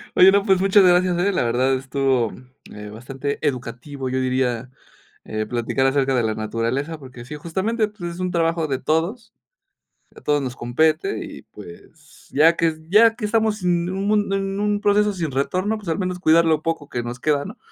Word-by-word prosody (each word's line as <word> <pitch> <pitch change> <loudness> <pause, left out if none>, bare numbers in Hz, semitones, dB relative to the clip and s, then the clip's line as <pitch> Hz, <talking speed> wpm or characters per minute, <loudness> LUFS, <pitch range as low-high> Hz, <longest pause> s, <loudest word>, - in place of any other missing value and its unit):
Oye, 185 +1 +8
no, 200 0 +3
pues 190 -3 +3
muchas 195 +1 +5
gracias, 180 0 +4
la 185 0 +1
verdad 125 +3 +1
estuvo, 135 -3 0 0.4
eh, 105 0 -9
bastante 135 +6 -5
educativo, 130 +1 -4
yo 130 +1 -1
diría, 130 -1 -1 0.6
eh, 110 0 -3
platicar 120 +3 0
acerca 135 0 +1
de 120 - +2
la 110 -1 -1
naturaleza, 115 +8 -3
porque 130 -3 -11
sí, 150 - -7
justamente, 190 +8 -1
pues, 180 -5 -7
es - - -10
un 180 0 -1
trabajo 165 -1 0
de 135 -2 -1
todos, 185 - -2 0.8
a - - -12
todos 145 -1 +1
nos 125 -2 -4
compete, 155 +7 0
y - - -10
pues, 85 - -15
ya 160 +4 +5
que 165 -1 +1
ya 225 +3 +6
que 240 - -6
estamos 220 -1 0
en 175 -1 +1
un 205 +2 0
en 195 0 -2
un 205 0 0
proceso 210 0 +3
sin 165 -5 -3
retorno, 185 +11 -1
pues, 205 -4 -11
al 165 - -1
menos 180 -2 -2
cuidar 165 -1 +5
lo 155 -2 +2
poco 160 -3 -3
que 120 - -3
nos 120 +1 -6
queda, 145 -1 +1
¿no? 210 - -10
160 Hz, 190 wpm, -22 LUFS, 130-190 Hz, 0.8 s, Oye